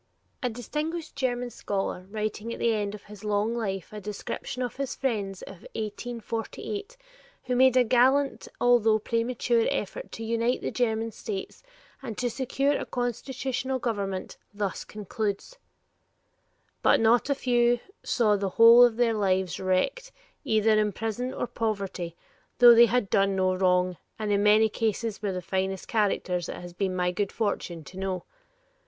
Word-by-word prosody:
A 250 - 0
distinguished 305 +8 -4
German 245 -2 -1
scholar 195 -3 -3
writing 215 +1 -3
at - - -5
the 230 - +2
end 205 -1 -2
of 205 - -12
his 210 0 -13
long 210 +2 0
life 200 -5 -3
a 210 - -6
description 210 +5 -5
of 245 - -5
his 275 -2 -3
friends 205 -8 -2
of 195 - -9 0.2
1848 235 - -5 0.5
who 250 - -1
made 260 0 +5
a 250 - +6
gallant 260 +4 +3
although 230 -3 +4
premature 230 +1 0
effort 195 -1 -4
to 225 - -6
unite 230 +2 0
the - - -2
German 225 -2 0
states 200 -2 -6 0.4
and 230 -6 -6
to 245 -1 -1
secure 270 +3 0
a - - -2
constitutional 260 +2 -2
government, 200 -6 -3
thus 205 -1 -3
concludes: 210 - -4 1.2
"But - - +5
not 230 +4 +3
a 280 - +2
few 240 -2 +2 0.2
saw 215 -3 +2
the 200 -1 -1
whole 230 +1 +9
of 240 -2 +4
their 240 -2 +3
lives 190 -4 0
wrecked, 190 - 0 0.3
either 220 -5 +2
in 210 -1 +1
prison 225 +5 -3
or - - -3
poverty, 195 -7 -3 0.4
though 240 -1 +9
they 235 +1 +8
had 245 -4 0
done 195 -1 +3
no 185 -1 +2
wrong, 180 -1 +2 0.2
and 215 -1 -2
in 200 0 +3
many 210 +1 +5
cases 220 0 -2
were 205 -2 -1
the 180 -1 -4
finest 190 +1 -2
characters 190 -5 0
it - - -4
has 175 0 -9
been 185 0 -1
my 180 0 +1
good 200 +2 -2
fortune 185 -6 -2
to 185 +4 -10
know. 190 -2 -2
220 Hz, 160 wpm, -27 LUFS, 195-245 Hz, 1.2 s, whole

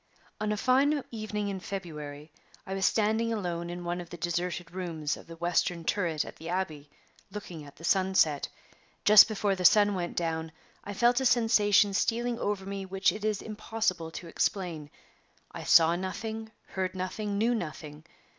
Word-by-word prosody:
"On 215 0 -1
a 210 - -1
fine 275 +5 +3
evening 215 -2 -3
in 195 -1 -4
February 150 -6 -7 0.3
I 190 - -5
was 195 -1 +2
standing 220 +1 +1
alone 175 -5 -3
in 175 0 -6
one 175 +1 -2
of 175 - -11
the 175 - -8
deserted 175 +1 -2
rooms 165 -5 -3
of - - -14
the 165 - -9
western 170 0 0
turret 170 -6 0
at - - -10
the 165 +1 -8
Abbey, 155 -6 -3 0.4
looking 185 -6 -8
at 145 - -14
the 165 - -15
sunset. 185 -6 +2 0.6
Just 210 0 +9
before 210 -2 0
the 185 -1 -4
sun 205 +3 +6
went 175 -2 -4
down 160 -1 -2 0.3
I 205 - -6
felt 240 +4 +3
a - - -1
sensation 210 -4 +4
stealing 235 +3 0
over 205 -2 -2
me 195 0 -4
which 190 0 +1
it 210 - -7
is 215 -2 -1
impossible 215 -5 -2
to 175 - -7
explain. 165 -4 -2 0.6
I - - -7
saw 165 0 +6
nothing, 220 +4 -5 0.2
heard 185 -1 -3
nothing, 200 +3 -3
knew 230 +4 +2
nothing. 155 -6 -6
190 Hz, 175 wpm, -29 LUFS, 170-210 Hz, 0.6 s, Just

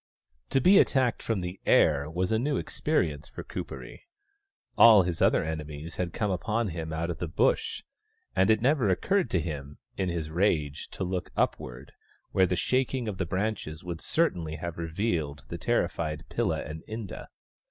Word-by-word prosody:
To 135 - +3
be 190 +9 +7
attacked 130 -3 +2
from 110 -5 -1
the 90 +2 -5
air 75 -1 +4
was 90 +4 -1
a 110 - +2
new 140 +3 0
experience 85 - -1
for - - -8
Kuperee. 65 -2 -7 0.7
All 110 -4 +8
his 85 -2 -3
other - - +4
enemies 75 0 -5
had 90 -2 -1
come 105 0 -1
upon 110 +4 -1
him 80 -1 -5
out 85 +2 -2
of 85 - -6
the 85 - -2
Bush, 75 - +1 0.5
and 95 +2 +3
it 110 0 +3
never 130 -5 +3
occurred 190 - +1
to 90 - +1
him, 75 -3 -5 0.2
in 95 -2 0
his 80 -2 -3
rage, 80 -5 0
to - - -3
look 90 -1 -3
upward, - - -2 0.4
where 95 -1 +4
the 90 - 0
shaking 130 +6 0
of 100 -4 -4
the 95 - -1
branches 95 -4 -3
would 85 -2 -5
certainly 85 - 0
have 85 +1 -6
revealed 80 -4 -2
the - - -5
terrified 75 -2 -1
Pilla - - 0
and 80 +1 -7
Inda. 110 -3 -6
90 Hz, 175 wpm, -28 LUFS, 80-110 Hz, 0.7 s, All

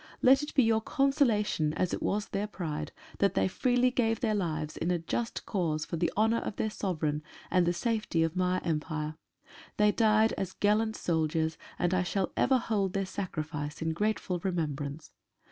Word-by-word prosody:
Let 265 +2 +7
it 295 - -6
be 265 - +6
your 225 -1 +3
consolation, 235 - +1
as 185 - 0
it - - -2
was 210 +1 -1
their 200 +1 -2
pride, 160 - -4 0.3
that - - +2
they 95 - +3
freely 250 - +2
gave 225 -3 +1
their 220 -4 +1
lives 155 -6 -2
in 170 - -2
a 180 - +2
just 225 +8 -3
cause 160 -6 -1
for - - -4
the 170 +1 +1
honour 225 +2 +3
of - - -5
their 215 - -1
Sovereign 155 -7 -1 0.3
and 180 -2 +3
the - - +4
safety 210 -4 0
of 165 +1 -1
My 185 0 +1
Empire. 155 -1 -2 0.6
They 210 0 +5
died 220 0 +3
as 185 -1 -3
gallant 215 +2 +2
soldiers, 160 -1 0 0.2
and 175 +1 +1
I 185 - +3
shall 185 +1 -1
ever 260 0 +3
hold 205 -6 -1
their 195 0 0
sacrifice 155 -6 -4
in 160 0 -1
grateful 200 -1 -1
remembrance. 155 -4 -3
185 Hz, 180 wpm, -30 LUFS, 160-220 Hz, 0.6 s, Let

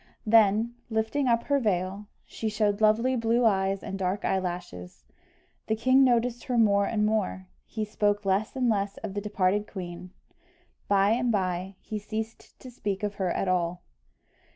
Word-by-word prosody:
Then, 220 +1 +4 0.2
lifting 225 +5 0
up 235 -1 +2
her 285 -1 +1
veil, 195 -2 -1 0.2
she 220 - -4
showed 210 -1 0
lovely 230 +4 +3
blue 230 0 +2
eyes 195 -2 +1
and 195 - -5
dark 190 +2 -1
eyelashes. 175 - -4 0.6
The 220 - +1
king 260 +4 +4
noticed 240 -1 +1
her 250 -2 -1
more 200 -3 +4
and 210 -2 0
more 210 -3 -1 0.2
he 220 -2 -3
spoke 205 -1 0
less 195 +5 0
and 255 -2 +1
less 200 -3 0
of 210 -3 -4
the 205 - -3
departed 205 0 0
queen; 180 -2 -7 0.8
by 200 0 +3
and 245 +1 +1
by 185 -1 -2
he 215 - -5
ceased 220 +1 -7
to 255 - -10
speak 205 -4 -4
of 205 -1 -1
her 185 - +1
at 195 - -1
all. 175 -1 0
210 Hz, 165 wpm, -27 LUFS, 190-225 Hz, 0.8 s, Then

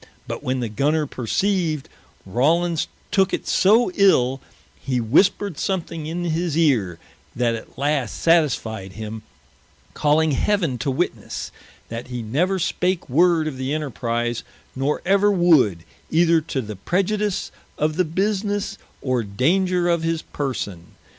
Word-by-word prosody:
But - - -4
when 130 0 -1
the 120 - -1
Gunner 150 +8 +1
perceived, 155 - -1 0.4
Rawlins 160 - +1 0.2
tooke 190 -1 +3
it - - -8
so 215 +2 +4
ill, 135 -10 +3 0.4
hee 130 -2 -1
whispered 175 - +2
something 165 -4 -2
in 170 +2 -3
his 165 -1 -1
eare, 115 - +2 0.4
that 120 -1 +1
at 115 - -8
last 140 -4 -1
satisfied 115 - +1
him, 110 +1 -6 0.7
calling 155 +1 +2
Heaven 165 - 0
to 140 - -1
witnesse, 130 - -3 0.4
that 115 +2 -6
he 125 -2 -5
never 170 - 0
spake 180 0 -1
word 165 +3 +3
of 140 -4 -4
the 130 +3 -2
Enterprize, 120 -5 -2 0.3
nor 135 +3 -1
ever 200 +2 +4
would, 155 - +4 0.3
either 165 0 +4
to 145 -3 -3
the 105 -2 -7
preiudice 200 - -1 0.3
of 155 0 0
the 185 - +3
businesse, 200 +3 -1 0.2
or 130 -2 +1
danger 175 - +1
of 170 -1 +2
his 165 0 -1
person. 105 - -5
155 Hz, 135 wpm, -22 LUFS, 125-180 Hz, 0.7 s, so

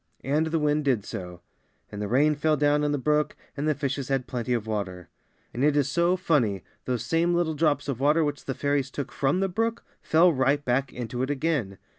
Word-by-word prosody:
And 150 +4 +1
the 160 +1 0
wind 150 0 +1
did 125 -7 +1
so, 90 -1 -7 0.5
and 105 - -6
the 105 - -2
rain 145 +7 +3
fell 150 +1 +1
down 145 +1 +2
in 150 - +1
the 145 - +1
brook, 150 +2 +1 0.2
and 145 +1 -2
the 155 - +2
fishes 140 -1 -3
had 135 -2 0
plenty 125 -1 -4
of 115 -3 0
water. 100 -5 -4 0.4
And 125 - -2
it 150 0 +3
is 140 -2 +2
so 175 +4 +2
funny! 120 - +1 0.2
those 125 -2 -2
same 170 +6 +2
little 170 -2 +1
drops 145 -2 +1
of 135 -4 -3
water 150 +4 +3
which 145 -1 -3
the 135 - -3
fairies 140 -2 0
took 140 +1 -5
from 140 +7 0
the 195 - +2
brook 225 +4 -1 0.2
fell 170 +2 +4
right 140 +2 +1
back 130 +2 0
into 125 0 -5
it 130 - -1
again. 140 -9 -1
145 Hz, 220 wpm, -26 LUFS, 125-155 Hz, 0.5 s, fell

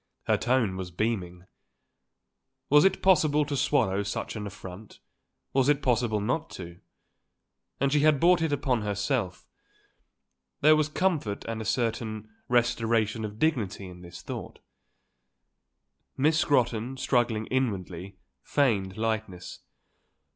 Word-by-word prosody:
Her - - +2
tone 120 -7 +1
was 95 -1 -5
beaming. 90 -2 -3 1.3
Was 150 +3 +7
it 190 0 +2
possible 155 -5 +4
to 145 0 -3
swallow 100 -6 +1
such 100 +3 -4
an 105 -1 -4
affront? 100 +1 -10 0.6
Was 135 0 +3
it 145 -1 +2
possible 120 -4 +1
not 130 +10 -1
to? 85 -1 -9 1.0
And 140 +1 +1
she 150 - +4
had 150 -1 +4
brought 175 +2 +4
it 160 -2 0
upon 135 -4 0
herself. 100 - -2 1.2
There 155 +2 +7
was 155 -1 +1
comfort 155 - -1
and 115 -1 -4
a - - -6
certain 110 -2 -2 0.2
restoration 115 -2 +1
of 105 0 -6
dignity 110 -10 0
in 90 -1 -11
this 85 0 -11
thought. - - -7 1.6
Miss 155 +4 +3
Scrotton, 125 -3 +1
struggling 120 -4 +1
inwardly, 95 -7 -2 0.2
feigned 100 - 0
lightness. 110 -5 -3
115 Hz, 125 wpm, -27 LUFS, 100-140 Hz, 1.6 s, Was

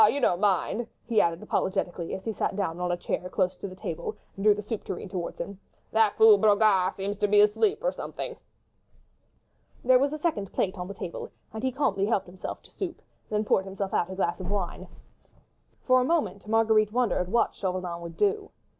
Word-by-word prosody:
you 285 - +1
don't 180 -8 +2
mind?" 210 +3 +1 0.2
he 225 -3 +4
added, 170 0 0
apologetically, 175 -2 -1
as 190 - -9
he 225 - -1
sat 205 - -1
down 180 -4 -2
on 180 0 -1
a 175 - 0
chair 180 +1 -3
close 185 -1 0
to 200 - -6
the 185 - -9
table 170 -2 -5 0.2
and 195 - -6
drew 210 -1 +6
the 210 - -5
soup 215 +1 -4
tureen 190 - -5
towards 180 -2 -4
him. 200 -1 -6 0.3
"That 220 -2 +3
fool 220 -2 +8
Brogard 205 -3 +4
seems 200 +1 -3
to 210 - +2
be 205 0 +5
asleep 225 - +2
or - - +2
something." - - -6 1.5
There 255 0 +6
was 280 +2 +2
a 305 - -3
second 290 - -1
plate 190 - 0
on 180 - -4
the 200 - -7
table, 175 - -6 0.2
and 220 - -5
he 260 +1 0
calmly 200 -7 +1
helped 210 -3 +1
himself 180 +1 -7
to - - -17
soup, 360 -4 -5 0.3
then 215 0 0
poured 190 - +2
himself 195 0 -4
out 175 - +1
a 190 - -5
glass 185 -2 -1
of 185 -1 -5
wine. 185 -2 -3 1.0
For 255 0 +5
a - - +2
moment 280 -9 0
Marguerite 220 -1 +3
wondered 220 -6 0
what 235 - +2
Chauvelin 180 -2 -3
would 170 -1 -8
do. 415 0 +1
200 Hz, 210 wpm, -27 LUFS, 185-225 Hz, 1.5 s, fool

